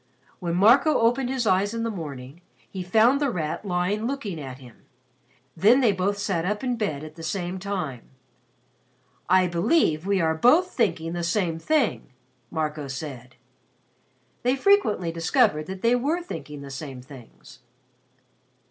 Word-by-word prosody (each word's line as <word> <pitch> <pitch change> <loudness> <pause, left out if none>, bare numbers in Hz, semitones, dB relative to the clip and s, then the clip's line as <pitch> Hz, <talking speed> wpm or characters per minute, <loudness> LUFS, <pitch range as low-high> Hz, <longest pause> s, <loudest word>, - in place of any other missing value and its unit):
When 170 -1 -2
Marco 245 - +5
opened 245 +3 +2
his 260 -2 -1
eyes 200 +2 +2
in 230 - -2
the 230 - -1
morning, 145 -4 -8 0.3
he 190 - -6
found 225 +9 +3
The 285 - +2
Rat 160 -7 -3
lying 200 +3 -1
looking 220 - -4
at 130 -2 -7
him. 125 -4 -15 0.8
Then 215 +10 +5
they 240 -5 +4
both 195 +1 -1
sat 190 -4 -1
up 210 +5 -2
in 250 -2 0
bed 155 -11 -3
at 155 0 -9
the 165 - -12
same 175 +2 -3
time. 180 -11 -5 1.2
"I 185 0 +5
believe 175 - +1
we 200 -1 +2
are 160 -2 +2
both 305 - +4
thinking 165 -8 -1
the 175 - -3
same 170 -1 -1
thing," 255 - 0 0.4
Marco 155 -2 -3
said. 135 -3 -7 1.1
They 250 +2 +2
frequently 260 - +2
discovered 165 - +1
that 190 0 -7
they 235 +1 +4
were 300 +8 -1
thinking 150 - -8
the 140 - -9
same 135 -2 -7
things. 125 -2 -15
185 Hz, 155 wpm, -25 LUFS, 155-230 Hz, 1.2 s, Marco